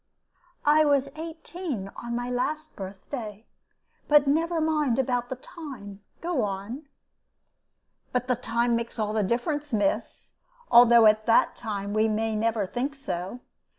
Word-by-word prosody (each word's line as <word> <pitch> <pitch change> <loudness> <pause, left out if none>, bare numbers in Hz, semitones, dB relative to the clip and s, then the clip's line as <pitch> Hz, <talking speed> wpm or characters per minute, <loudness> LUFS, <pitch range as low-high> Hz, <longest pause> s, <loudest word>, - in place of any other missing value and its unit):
"I 300 +1 +6
was 280 -2 +2
eighteen 320 - -6
on 235 0 -5
my 245 0 -2
last 305 +5 -2
birthday. 210 +3 -7 0.6
But 295 -1 +6
never 325 +4 +1
mind 305 -6 +1
about 245 -2 0
the 260 - -3
time 245 - -10 0.2
go 335 -6 0
on." 210 +8 -4 1.2
"But 250 0 0
the 250 - +2
time 235 0 0
makes 235 +1 -4
all 215 -1 -1
the 215 - +1
difference, 275 - -1
miss, 240 +8 -1 0.4
although 235 -1 +8
at 215 +1 +4
the 230 - +5
time 205 -3 -4
we 215 +1 +3
may 220 0 0
never 220 -1 0
think 255 +8 -3
so. 240 -4 -5
245 Hz, 140 wpm, -26 LUFS, 215-290 Hz, 1.2 s, although